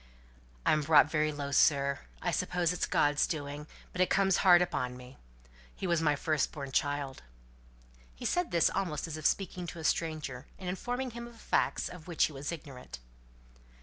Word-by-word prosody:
"I'm 155 - +4
brought 150 0 +5
very 155 -1 +2
low, 145 -1 -5
sir. 140 0 +3 0.2
I - - +1
suppose 175 -1 0
it's 180 - -1
God's 145 0 +2
doing; 145 -1 -5 0.2
but 180 - -2
it 185 - +3
comes 195 -1 +3
hard 180 -2 +7
upon 125 -8 -1
me. 125 +1 -13 0.6
He - - -5
was 170 -2 +2
my 150 -2 +3
firstborn 145 -2 -1
child." 145 -1 -1 0.9
He - - -8
said 355 -1 +1
this 170 - +3
almost 175 -7 -2
as 165 -2 -5
if 155 - +2
speaking 185 -2 -2
to 170 - -7
a - - -7
stranger, 155 -5 -1
and 185 - -8
informing 245 +8 -3
him 235 +1 -7
of 235 -1 -15
facts - - 0
of 180 -2 -10
which 170 -3 +1
he 155 - +1
was 140 +3 -4
ignorant. 140 - -8
155 Hz, 180 wpm, -31 LUFS, 145-180 Hz, 0.9 s, hard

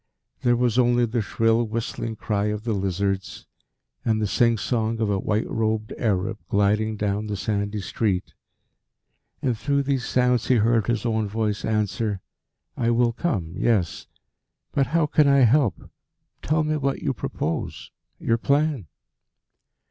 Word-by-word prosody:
There 120 -2 +3
was 120 0 +1
only 120 0 +4
the 115 0 -1
shrill 115 +3 +2
whistling 115 0 -3
cry 105 -1 -1
of 105 0 -2
the 115 -1 -1
lizards, 95 0 -2 0.6
and 110 -1 +1
the 110 - 0
sing 115 +3 +3
song 115 0 -1
of 110 -2 +1
a 100 - +1
white 105 +3 0
robed 110 -1 -1
Arab 105 0 -1
gliding 105 +2 +1
down 105 +1 -1
the 105 -1 -3
sandy 100 0 -2
street. 95 -2 -1 1.1
And 125 -3 +1
through 140 +5 0
these 135 -2 0
sounds 125 -2 +1
he 130 - +4
heard 115 -1 +2
his 120 0 0
own 110 -2 0
voice 105 -1 -1
answer: 105 -1 -1 0.6
"I 115 -1 0
will 120 0 +2
come 100 - -2
yes. 100 -4 0 0.6
But 135 - +1
how 165 +1 +2
can 150 0 +3
I 140 -1 +5
help? 125 -1 +2 0.5
Tell 155 +1 +1
me 155 0 0
what 140 -1 -2
you 135 - 0
propose 80 -7 -4 0.3
your 115 0 +1
plan?" 140 - +1
110 Hz, 150 wpm, -24 LUFS, 105-125 Hz, 1.1 s, I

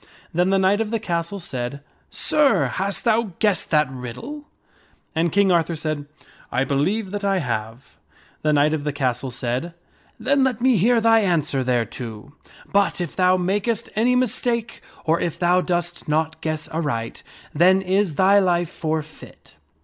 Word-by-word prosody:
Then 180 +2 +2
the 195 - +3
knight 190 +3 +3
of 220 - -2
the 230 0 -1
castle 170 -1 -3
said, 135 -6 -5 0.2
" - - -40
Sir, 275 - +2
hast 195 +10 -2
thou 225 -4 +1
guessed 205 -5 +1
that 150 -2 +3
riddle? 135 - -7 0.3
" - - -36
And 165 +1 +1
King 200 +1 +3
Arthur 170 -1 +2
said, 155 -2 -4 0.2
" - - -25
I 125 - +1
believe 185 +10 0
that 205 0 -4
I 195 -1 +2
have." 115 - -5 0.4
The 155 - +1
knight 150 +1 +3
of 155 -2 -2
the 150 -1 -2
castle 130 -2 -1
said, 125 +7 -3 0.4
"Then 280 0 +2
let 255 -4 0
me 255 0 +3
hear 230 +5 +3
thy 225 0 +5
answer 155 -9 0
thereto. 120 0 -3 0.4
But 200 -1 +2
if 175 -3 -4
thou 185 0 +3
makest 205 +5 -1
any 240 +3 +3
mistake, 240 -1 -1 0.2
or 165 +1 +2
if 170 - -2
thou 180 +1 +3
dost 175 -1 -2
not 155 +1 -1
guess 155 -1 -3
aright, 145 -8 -3 0.3
then 185 +5 +4
is 190 -3 +1
thy 195 +4 +5
life 175 -3 +1
forfeit." 155 -1 -6
175 Hz, 170 wpm, -22 LUFS, 145-200 Hz, 0.4 s, thy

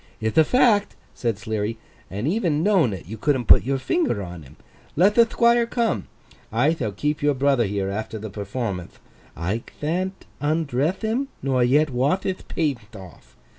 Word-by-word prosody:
'Ith 110 0 -2
a 160 - +7
fact,' 215 - +3 0.2
said 115 -4 -2
Sleary, 110 +1 -3 0.3
'and 105 +7 -3
even 165 -5 +1
knowin' 185 - +3
it, 95 -4 -7
you 110 +5 -8
couldn't 130 -1 +1
put - - +7
your 135 +2 0
finger 295 - 0
on 90 -2 -8
him. 70 0 -15 0.4
Let 190 +6 +4
the 235 +1 +5
Thquire 235 0 +3
come. 235 -2 -1 0.4
I 125 +8 +3
thall 120 -10 -3
keep 150 +9 -2
your 145 -1 +2
brother 135 -4 +2
here 100 -1 -2
after 110 +2 -4
the 110 -1 -7
performanth. 100 -2 -5 0.4
I 95 +8 -2 0.2
thant 185 +5 -2 0.2
undreth 150 - 0
him, 235 +6 0 0.2
nor 130 -2 +2
yet 145 +4 +3
wath 140 +10 +1
hith 190 -1 -4
paint 120 -9 -3
off. 85 - -13
135 Hz, 170 wpm, -23 LUFS, 105-170 Hz, 0.4 s, a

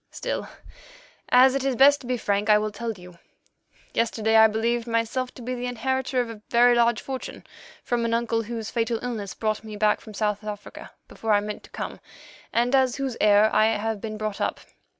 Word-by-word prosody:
"Still, - - -4 0.8
as 255 +1 +6
it 275 -1 -1
is 270 -2 0
best 280 +3 +6
to 250 - -10
be 250 0 0
frank, 205 -1 -1
I 210 - +7
will 215 0 -2
tell 230 +2 -4
you. 180 -3 -14 0.7
Yesterday 225 -1 +1
I 220 0 +8
believed 230 +2 -1
myself 230 +2 -1
to 245 - -10
be 250 +2 -3
the 250 0 -4
inheritor 260 +1 -1
of 245 - 0
a 215 -2 -11
very 245 +1 +5
large 235 -2 +3
fortune 265 -1 -7 0.4
from 240 -1 -1
an 230 - -1
uncle 230 -1 0
whose 225 -1 -5
fatal 230 -1 0
illness 220 -6 -4
brought 215 -1 -2
me 215 -1 -8
back 210 0 +2
from 215 -2 -12
South 210 0 -1
Africa 210 -1 -8 0.2
before 225 -1 -2
I 205 - +5
meant 210 0 -5
to - - -18
come, - - -6 0.5
and 240 +2 +1
as 260 -2 +3
whose 270 -3 -3
heir 210 +1 +5
I 215 - +5
have 220 -1 -3
been 215 -1 -5
brought 215 -1 -4
up. - - -2
230 Hz, 205 wpm, -25 LUFS, 215-245 Hz, 0.8 s, I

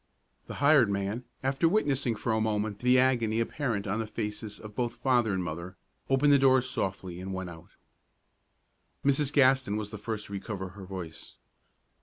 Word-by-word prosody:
The - - -6
hired 140 -5 +5
man, 100 +5 -2 0.2
after 135 +5 +2
witnessing 140 - +1
for 115 - -2
a 110 - +1
moment 105 -1 -1
the 125 +1 +4
agony 120 -4 +2
apparent 115 -3 -1
on 105 +2 -1
the 110 - -2
faces 105 -1 -5
of 105 -1 -10
both 120 0 -1
father 120 -3 +2
and 95 -1 -1
mother, 85 +2 -6 0.3
opened 140 +2 +4
the 140 - +6
door 130 -1 +5
softly 95 -5 -3
and 95 0 -5
went 95 -2 -5
out. 80 -1 -14 1.3
Mrs. 140 0 +2
Gaston 130 -6 +3
was 105 -1 -4
the 105 - -7
first 105 0 -4
to 100 - -10
recover 95 -1 -5
her 95 +1 -11
voice. 90 -4 -8
110 Hz, 175 wpm, -29 LUFS, 100-130 Hz, 1.3 s, the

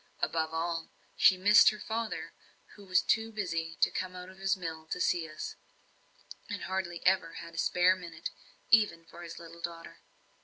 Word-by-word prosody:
Above 160 -1 0
all, 165 0 -2 0.3
she 185 - +6
missed 205 +4 +7
her 215 - -6
father, 225 +1 -4 0.4
who 205 - -14
was 185 -1 +3
too 225 0 +1
busy 165 -6 -3
to - - +4
come 185 0 -4
out 180 0 -8
of 190 0 -15
his 195 0 +1
mill 160 -3 -6
to 160 - -3 0.3
us, 155 0 -6 0.9
and - - -4
hardly 185 -3 -3
ever 185 -3 +3
had 170 0 -9
a - - -11
spare 180 +1 +4
minute, 170 -3 -7 0.4
even 210 -7 +4
for 170 - -13
his 170 -1 -8
little 170 0 -11
daughter. 170 -1 -7
180 Hz, 170 wpm, -31 LUFS, 165-190 Hz, 0.9 s, missed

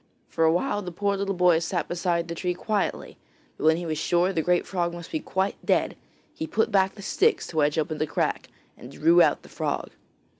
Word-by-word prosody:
For 165 - +1
awhile 195 +7 +1
the 180 -2 -6
poor 200 +3 -1
little 195 0 -2
boy 175 -2 +4
sat 170 0 -2
beside 175 -1 -1
the 170 - -4
tree 180 +1 -2
quietly, 210 +2 -2 0.4
but - - -5
when 160 +1 +5
he 175 - -5
was 155 -2 -2
sure 175 +4 +1
the 165 - +1
great 175 +2 +1
frog 175 -2 -2
must 170 -1 -9
be 315 - -1
quite 190 -8 -2
dead, - - +1 0.4
he 320 - -5
put 225 -5 0
back 190 -1 +2
the 200 - -10
sticks 440 - +2
to 160 - -7
wedge 150 +1 +2
open 155 0 -1
the 155 - 0
crack 145 - -2 0.3
and 125 - -12
drew 165 +5 +4
out - - +3
the - - -14
frog. - - -3
175 Hz, 220 wpm, -25 LUFS, 165-195 Hz, 0.4 s, when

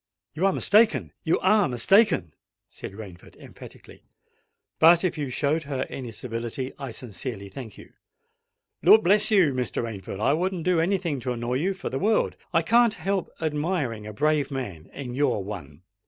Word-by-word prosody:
"You 170 +5 +1
are - - +3
mistaken—you 160 - +2
are 200 -2 +3
mistaken," 125 - +3 0.3
said - - -9
Rainford, 95 -5 -11
emphatically. - - -14 0.8
"But, 170 +2 +6
if 185 - 0
you 145 -4 -4
showed 145 +5 -1
her 135 -2 -3
any 130 -3 -6
civility, 115 +3 -5
I 135 -2 -5
sincerely 110 -3 -6
thank 110 +1 -9
you——" - - -15 0.9
"Lord 220 - +7
bless 210 +4 +5
you! 185 -10 +4
Mr. 125 -1 -2
Rainford—I 105 +2 -2
wouldn't 180 +1 -1
do 180 -1 +2
any 185 +4 +2
thing 165 -7 -3
to 125 +1 -3
annoy 120 +1 -2
you 190 +7 -1
for - - -6
the 135 - -2
world. 215 +3 +1 0.2
I 165 - +2
can't 235 +4 +4
help 195 -1 -2
admiring 150 - -2
a - - -6
brave 150 +2 +1
man—and 125 - -6
you're 135 -4 +1
one. 90 -6 -9
140 Hz, 160 wpm, -25 LUFS, 115-180 Hz, 0.9 s, Lord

